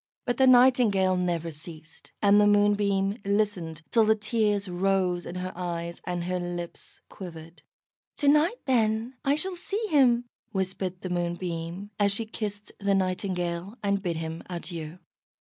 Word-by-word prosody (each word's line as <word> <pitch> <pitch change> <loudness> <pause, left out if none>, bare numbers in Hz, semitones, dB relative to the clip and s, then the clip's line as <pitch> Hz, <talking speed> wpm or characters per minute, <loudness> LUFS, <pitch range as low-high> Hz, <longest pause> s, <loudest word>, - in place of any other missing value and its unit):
But 245 -1 -1
the 265 - +5
Nightingale 245 -7 +5
never 170 -2 -1
ceased, 155 +1 -12
and 205 +1 +6
the 205 - +5
Moonbeam 205 0 +2
listened 195 -6 -1
till 230 -2 +5
the 220 0 +4
tears 210 -2 0
rose 180 -1 0
in 175 - -6
her 180 0 -4
eyes 170 -1 -4
and 175 -1 -2
her 180 +1 -1
lips 175 -1 -6
quivered. 165 -3 -10 0.6
"To 290 - +1
night, 300 +10 +4
then, 230 -2 +1
I 280 +1 +3
shall 375 +5 -1
see 410 +5 -3
him," 245 -5 +4 0.3
whispered 190 -1 -2
the 185 - -5
Moonbeam, 175 +2 -3
as 200 -1 +4
she 225 +3 0
kissed 210 -1 -6
the 200 -1 +2
Nightingale, 185 +1 -2
and 200 -1 +1
bid 175 -4 -2
him 160 0 -5
adieu. 170 -2 -6
195 Hz, 150 wpm, -27 LUFS, 175-215 Hz, 0.6 s, and